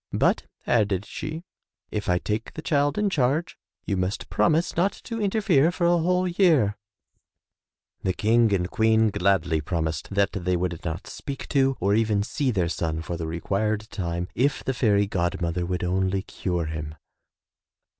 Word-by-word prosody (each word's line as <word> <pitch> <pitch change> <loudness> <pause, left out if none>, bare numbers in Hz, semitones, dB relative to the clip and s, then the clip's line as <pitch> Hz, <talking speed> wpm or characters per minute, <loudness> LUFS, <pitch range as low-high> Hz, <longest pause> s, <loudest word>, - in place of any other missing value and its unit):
"But," - - +1 0.2
added 105 -4 +1
she, 155 +8 -6 0.5
"if 105 -3 -3
I 90 - +3
take 105 +4 -3
the 155 - -7
child 145 -2 +1
in 210 - +2
charge 145 +3 +1 0.3
you 100 - 0
must 95 +2 -2
promise 170 +2 +2
not 190 +4 +2
to 230 -2 -5
inter 210 +2 +1
fere 165 -5 +4
for 175 0 -1
a 175 0 +4
whole 180 +2 +2
year/' 170 - +3 1.3
The 95 - 0
King 115 +3 +3
and 90 -3 +1
Queen 110 0 +3
gladly 90 -5 +1
promised 80 0 -2
that 100 0 +1
they 90 -2 -1
would 85 -2 -3
not 85 +1 -4
speak 140 -1 -7
to 135 -1 +2
or 100 +2 +2
even 105 -2 +2
see 135 +5 -1
their 95 -8 +1
son 80 -1 -2
for 85 - -4
the 85 -1 -4
required 105 +6 -2
time 85 -2 -3
if 140 +4 +1
the 130 - -1
fairy 105 -5 +3
god 90 -4 -1
mother 85 0 -1
would 90 0 -2
only 95 +1 0
cure 90 -4 -2
him. 75 -1 -5
105 Hz, 170 wpm, -25 LUFS, 90-140 Hz, 1.3 s, fere